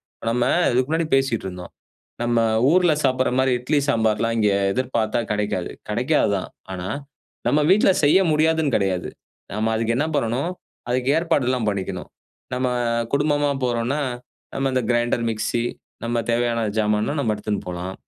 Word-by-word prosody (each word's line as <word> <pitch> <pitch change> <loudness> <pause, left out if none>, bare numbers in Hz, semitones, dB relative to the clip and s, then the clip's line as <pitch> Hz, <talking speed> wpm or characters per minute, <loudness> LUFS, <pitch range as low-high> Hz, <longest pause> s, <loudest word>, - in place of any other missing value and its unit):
இப்ப - - -12
நம்ம 120 +1 +1 0.3
இதுக்கு 125 +2 +1
முன்னாடி 160 0 0
பேசிட்ருந்தோம். 95 -9 -2 0.5
நம்ம 120 -1 +2 0.3
ஊர்ல 180 -1 +4
சாப்பிடுற 130 -1 +2
மாரி 130 0 +3
இட்லி 145 +4 +1
சாம்பார்லாம் 115 -2 +1
இங்கே 105 -2 +3 0.2
எதிர்பாத்தா 120 -3 0
கெடைக்காது. 105 -4 -1 0.2
கெடைக்காது 120 +3 +1
தான். 95 - -5 0.2
ஆனா, 90 0 -5 0.6
நம்ம 150 +1 +3
வீட்ல 195 0 +5
செய்ய 145 +6 +6
முடியாதுன்னு 155 -2 +2
கெடையாது. 95 -3 -1 0.5
நம்ம 110 +1 0
அதுக்கு 115 +1 0
என்ன 150 +4 +1
பண்ணணும், 130 +7 -1 0.4
அதுக்கு 125 +1 0
ஏற்பாடுலாம் 130 -8 +1
பண்ணிக்கணும். 95 -2 -3 0.4
நம்ம 125 0 0 0.4
குடும்பமா 145 0 +2
போறோன்னா 120 +3 0 0.6
நம்ம 135 0 0
இந்த 130 -1 +1
கிரைண்டர், 120 0 +1
மிக்ஸி 115 +1 -1 0.4
நம்ம 120 0 -1
தேவையான 115 0 +1 0.2
ஜாமான்லாம் 105 +6 +1
நம்ம 110 -5 +1
எடுத்துன் 105 0 -3
போலாம். 90 +1 -5
120 Hz, 140 wpm, -22 LUFS, 110-135 Hz, 0.6 s, செய்ய